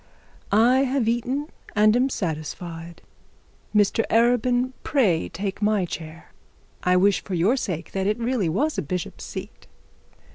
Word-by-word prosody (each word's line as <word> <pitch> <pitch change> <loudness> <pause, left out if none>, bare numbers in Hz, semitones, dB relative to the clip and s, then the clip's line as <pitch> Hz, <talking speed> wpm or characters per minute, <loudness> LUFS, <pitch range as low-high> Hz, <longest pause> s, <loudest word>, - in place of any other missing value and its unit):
'I 230 +5 +5
have 260 -3 0
eaten 250 +5 -1 0.3
and 215 +1 +5
am 255 +2 +3
satisfied; 165 - -5 0.7
Mr 210 +2 +3
Arabin, 245 +2 +3
pray 205 - +1
take 195 +3 -4
my 210 -3 +2
chair. 165 -1 -8 0.5
I 180 0 +3
wish 200 +1 +3
for 190 - -4
your 185 +9 +3
sake, 180 - -4
it 195 +2 0
really 235 -6 0
was 295 - 0
a - - 0
bishop's 180 +3 -5
seat.' - - -8
210 Hz, 135 wpm, -24 LUFS, 175-245 Hz, 0.7 s, I